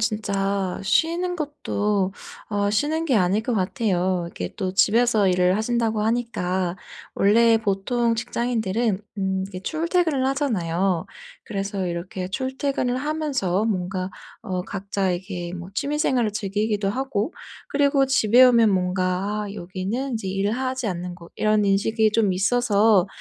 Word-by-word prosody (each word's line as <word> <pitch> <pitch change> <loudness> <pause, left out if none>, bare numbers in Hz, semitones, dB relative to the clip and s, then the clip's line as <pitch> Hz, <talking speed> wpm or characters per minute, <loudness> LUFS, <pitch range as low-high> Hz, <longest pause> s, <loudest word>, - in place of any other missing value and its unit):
진짜 200 -3 -1
쉬는 335 - +1
것도 210 - -1 0.4
어 205 -1 +1
쉬는 305 +9 0
게 265 -7 +2
아닐 190 +2 +2
것 240 0 -1
같아요. 185 -3 0
이게 90 0 -6
또 185 0 -3
집에서 220 -1 +4
일을 180 +1 +3
하신다고 225 -1 0
하니까 190 -6 -1 0.4
원래 225 +3 +4
보통 225 +3 0
직장인들은 225 -3 -1 0.2
음 190 -1 -1
이게 185 -2 -8
출퇴근을 320 - 0
하잖아요. 195 - 0 0.4
그래서 195 -2 -3
이렇게 175 +2 -4
출퇴근을 260 +2 -1
하면서 265 - -1
뭔가 185 -3 -2 0.3
어 185 -5 -3
각자 195 -1 -2
이렇게 175 -1 -5
뭐 175 +1 -7
취미 290 +7 -2
생활을 240 -7 +1
즐기기도 205 0 -1
하고 260 - -2 0.4
그리고 280 -1 +3
집에 250 -1 +5
오면 235 -4 +6
뭔가 185 +2 0
'아 200 - -6
여기는 195 +9 -4
인제 220 -4 -3
일을 195 +2 0
하지 255 0 -2
않는 180 -1 -4
곳.' 170 -1 -14
이런 215 -1 +2
인식이 215 +3 +2
좀 215 -3 +2
있어서 205 0 +3
210 Hz, 295 characters per minute, -23 LUFS, 190-245 Hz, 0.4 s, 오면